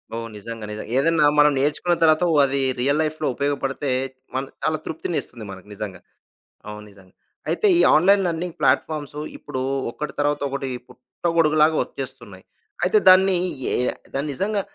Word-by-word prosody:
ఓహ్! 115 0 -4
నిజంగా! 115 +1 -7
నిజంగా! 105 +1 -7
ఏదన్నా 160 +1 +3
మనం 150 0 +6
నేర్చుకున్న 150 +5 +1
తర్వాత 155 +1 +4
ఓహ్! 150 - +4
అది 140 0 -1 0.2
రియల్ 140 +4 +1
లైఫ్‌లో 155 0 -2
ఉపయోగపడితే, 140 0 -2 0.5
మన్ 135 +1 -2 0.2
చాలా 155 - +1
తృప్తినిస్తుంది 155 -8 -5
మనకు 95 +1 -11
నిజంగా. 100 -2 -7 0.7
అవును 105 0 -8
నిజంగా. 95 -2 -20 0.4
అయితే, 430 - +2
ఈ - - +6
ఆన్‌లైన్ 195 +5 +5
లెర్నింగ్ 170 0 -4
ప్లాట్‌ఫామ్స్ 150 -2 0 0.2
ఇప్పుడు 130 - -5 0.3
ఒకటి 150 +5 -6
తర్వాత 145 0 +1
ఒకటి 135 -1 -4 0.2
పుట్టగొడుగులాగా 155 +4 +1
ఒచ్చేస్తున్నాయి. 125 -8 -9 0.4
అయితే 185 +4 +4
దాన్ని 190 0 +6 0.3
యే - - 0 0.4
దాన్ని 140 +2 -2
నిజంగా 200 +7 -1
145 Hz, 140 wpm, -22 LUFS, 125-160 Hz, 0.7 s, మనం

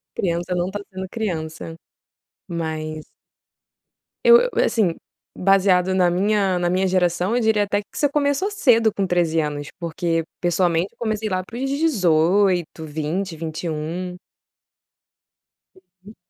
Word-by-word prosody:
Criança 175 0 -1
não 175 +1 -1
tá 205 - -4
sendo 190 0 -6
criança. 165 -7 -4 0.7
Mas 155 -2 -4 1.2
eu 475 -1 +9
eu, - - 0
assim, 190 -8 +1 0.4
baseado 190 -1 +3
na 180 -2 +4
minha 195 0 +1
na 175 0 0
minha 185 +1 +1
geração, 180 +3 +1
eu 245 - +2
diria 220 -2 +3
até 205 0 0
que - - -15
você 290 - +2
começou 285 +7 0
cedo 230 - +3
com 195 -2 -1
13 170 -2 +1
anos. 145 -1 -3
Porque, 165 0 -1 0.2
pessoalmente, 175 0 +1
eu - - -33
comecei 215 -2 -2
lá 185 0 -1
para 230 +5 -10
os 270 +1 -2
18, 185 - +2
20, 160 +4 -3
21. 165 +2 -4 1.6
Uhum. 185 +3 -18
185 Hz, 135 wpm, -22 LUFS, 165-205 Hz, 1.6 s, eu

